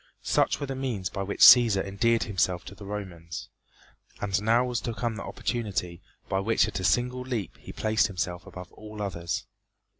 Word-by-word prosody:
Such - - +2
were 145 - -2
the 135 - -4
means 125 -9 -3
by 100 - -4
which 100 +1 -4
Cæsar 115 -6 +8
endeared 115 +4 +1
himself 95 -4 0
to - - -9
the 100 0 -11
Romans. 90 -6 -6 0.7
And 100 -1 0
now 115 +3 +3
was 125 -2 -2
to 115 - -4
come 120 -1 -2
the - - -6
opportunity 95 -7 -3 0.3
by 95 - 0
which 110 +3 +2
at - - -4
a - - -4
single 125 +8 +1
leap 125 -6 -4
he - - -10
placed 110 0 +1
himself 90 -2 -4
above 90 -1 -10
all 110 0 -10
others. 85 -5 -3
105 Hz, 185 wpm, -27 LUFS, 95-115 Hz, 0.7 s, Cæsar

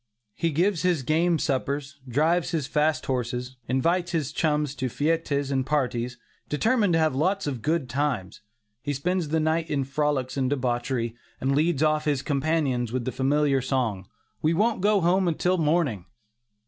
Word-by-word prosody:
He 165 - 0
gives 170 +3 +1
his 175 -6 +1
game 165 +5 +2
suppers, 140 0 -2
drives 160 +7 +2
his 160 -4 -1
fast 155 +2 +1
horses, 125 0 -3
invites 170 +8 +1
his 155 -4 -1
chums 150 -2 0
to 130 -2 -2
fêtes 145 0 0
and 135 -1 +1
parties, 125 -3 -1 0.3
determined 210 - +2
to 165 - +3
have 155 -3 +2
lots 185 +9 0
of 135 -5 -3
"good 155 +1 0
times." 130 -8 -2 0.4
He 145 +4 -2
spends 175 +5 -1
the 160 +2 +1
night 160 +1 0
in 140 -2 0
frolics 135 -1 -1
and 130 -2 +1
debauchery, 120 -3 -1 0.2
and 135 +1 0
leads 155 0 +2
off 155 0 +2
his 145 -3 0
companions 140 -5 0
with 125 -1 -2
the 130 - -1
familiar 135 +2 +2
song, 120 -8 -1 0.3
"we 160 +2 +2
won't 215 +2 +1
go 205 0 +3
home 180 +1 +3
till 180 +3 +1
morning." 150 - +1
145 Hz, 165 wpm, -26 LUFS, 130-165 Hz, 0.4 s, to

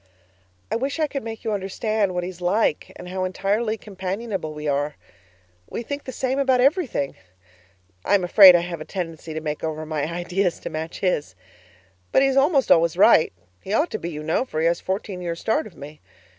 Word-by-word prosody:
I - - +1
wish 270 +5 -2
I 310 - +3
could 275 -3 -5
make 225 -1 -7
you 220 - -1
understand 200 0 -1
what 180 - -1
he 180 - -3
is 180 -1 -15
like 180 -2 +1
and 180 - -9
how 185 0 -2
entirely 205 +4 -1
companionable 195 -3 -4
we 150 0 -6
are. 145 +1 0 0.7
We 235 - -4
think 285 +4 -5
the 260 - -5
same 260 +2 -1
about 265 -2 +3
everything 275 - +1 0.9
I - - +3
am 195 - +2
afraid 185 0 +9
I 175 - +3
have 170 -2 -5
a - - -3
tendency 165 -3 -6
to 160 - -3
make 150 -1 -4
over 155 -1 -3
my 155 0 -2
ideas 175 +1 -1
to - - -6
match 160 +1 -5
his! 150 - -1 0.8
But - - +4
he - - +4
is 270 - 0
almost 275 0 +3
always 170 0 +4
right; 190 -4 +6 0.3
he 195 - -5
ought 305 +10 +2
to 215 - -3
be, 170 - -4
you 150 -2 -6
know, 160 +9 +1
for 155 -12 -5
he 160 - +1
has 170 +1 +1
fourteen 190 -1 -4
years' 170 -1 -4
start 260 +6 0
of 185 - -16
me. 150 +2 -11
185 Hz, 210 wpm, -23 LUFS, 165-225 Hz, 0.9 s, afraid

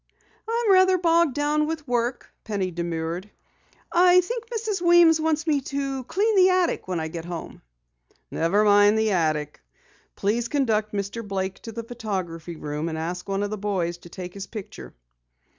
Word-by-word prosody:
"I'm 460 -2 +2
rather 375 0 +5
bogged 335 -4 +3
down 300 +1 +1
with 315 -2 -4
work," 245 0 -2
Penny 200 -4 -2
demurred. 170 +2 -4 0.6
"I 360 +1 +6
think 470 +5 -5
Mrs. 440 -5 -2
Weems 345 -2 +6
wants 315 0 0
me 295 -4 +1
to 275 -1 -3
clean 425 - +1
the 375 -1 +6
attic 365 - +1
when 180 -2 -2
I 160 - -2
get 165 +1 -6
home." 175 -1 -7 0.7
"Never 190 +6 +2
mind 205 0 +5
the 220 -1 +2
attic. 155 -4 -1 0.5
Please 230 +4 0
conduct 220 -6 0
Mr. 200 +3 -3
Blake 190 -2 -3
to 225 - -8
the 230 +1 -6
photography 185 -8 -5
room 150 +1 -4
and 160 - -4
ask 175 +4 -4
one 195 +1 0
of 205 - -3
the 215 - -4
boys 180 -4 -2
to 175 - -14
take 180 0 -8
his 195 -1 -7
picture." 215 -4 -9
215 Hz, 170 wpm, -24 LUFS, -, 0.7 s, I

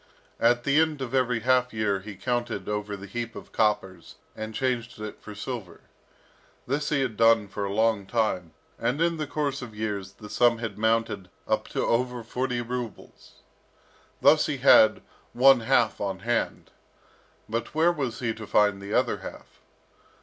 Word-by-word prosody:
At 120 +1 +3
the 140 +3 +3
end 160 -2 +1
of 130 - -6
every 125 -3 +1
half 125 +1 +2
year 105 -3 0
he 100 +1 -9
counted 120 -4 -2
over 105 -1 -3
the 100 - -9
heap 115 +3 -5
of - - -10
coppers, 95 -5 -1 0.2
and 110 0 -6
changed 125 -4 -2
it 105 0 -7
for 105 - -10
silver. 100 -4 -6 0.8
This 140 +3 -1
he 140 -2 +1
had 125 -5 -2
done 115 -1 +4
for 100 +1 -4
a 100 - -3
long 110 -1 +1
time, 95 -8 -1 0.3
and 125 +5 0
in 170 0 +1
the 155 -1 -3
course 140 -1 -2
of 115 -4 -9
years, 100 -3 -4
the 105 +1 -12
sum 120 +2 +3
had 115 -3 -5
mounted 110 -3 0 0.2
up - - 0
to - - -2
over 125 0 0
forty 125 +1 -2
rubles. 120 -1 -7 0.8
Thus - - +5
he - - -2
had - - +6 0.3
one 135 +1 +6
half 120 -1 +2
on 95 -2 -3
hand. 120 +2 -2 0.8
But 115 +5 -4
where 165 +2 +4
was 135 -9 -3
he 115 -2 0
to 110 -1 -9
find 105 -1 +3
the 100 +2 -4
other 125 -1 +2
half? - - -11
115 Hz, 170 wpm, -26 LUFS, 105-125 Hz, 0.8 s, had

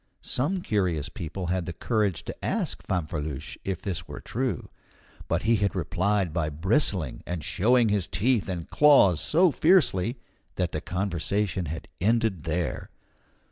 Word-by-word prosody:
Some 175 +8 -1
curious 90 -8 0
people 85 +3 -5
had 90 -3 -2
the 90 - -4
courage 105 0 0
to - - -6
ask - - -1
Fanfreluche 75 -5 -3
if 95 -3 -3
this 85 -4 -4
were - - -7
true; 130 +2 -3 0.6
but 85 +3 0
he 115 +1 +3
had 100 -1 0
replied 90 +1 0
by 80 -3 0
bristling, 90 - +1
and 90 -3 -3
showing 115 - +3
his 100 -4 +1
teeth 115 -1 +1
and 85 -3 -4
claws 135 - +5
so 170 +2 +4
fiercely, 135 - +3 0.4
that 90 -2 -1
the 75 - -3
conversation 95 0 -1
had 75 0 -6
ended 110 -4 +1
there. 85 +1 -2
95 Hz, 145 wpm, -27 LUFS, 85-110 Hz, 0.6 s, claws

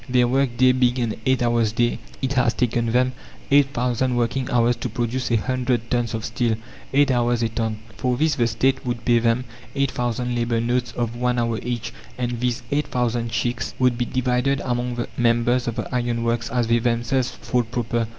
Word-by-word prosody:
Their 125 -1 +4
work 130 -1 +1
day 130 0 +6
being 125 -1 +2
an 120 -3 0
eight 130 -1 +3
hours 115 -2 +2
day, 120 0 +1 0.2
it 135 +1 0
has 125 -3 +2
taken 120 -1 0
them 125 +2 +3 0.4
eight 140 -1 +6
thousand 125 0 0
working 120 +2 0
hours 120 0 +3
to 120 - -4
produce 120 +2 -2
a 120 - +3
hundred 125 0 -1
tons 120 -2 0
of 110 0 -4
steel 115 -1 0 0.4
eight 140 0 +4
hours 120 -1 +1
a 115 - +1
ton." 110 -1 -2 0.2
For 125 -1 0
this 155 +2 +2
the 120 -4 +1
State 130 +4 +1
would 120 -2 -3
pay 120 -1 +4
them 115 +2 +1 0.3
eight 140 -1 +1
thousand 120 0 -2
labour 120 -1 0
notes 120 +1 0
of 120 -1 -2
one 125 0 0
hour 115 -2 0
each, 120 -1 -4 0.2
and 120 -1 -2
these 125 +1 -1
eight 145 +1 +1
thousand 120 -2 -1
cheques 120 +1 -2
would 125 -2 +3
be 120 +1 -1
divided 130 +2 0
among 120 0 -1
the 120 - -3
members 120 +1 +2
of 115 - -2
the 115 - -3
iron 120 -2 0
works 115 0 0
as 125 -2 +1
they 115 +1 +3
themselves 120 +2 0
thought 125 -2 -2
proper. 120 -1 -1
120 Hz, 205 wpm, -23 LUFS, 115-125 Hz, 0.4 s, day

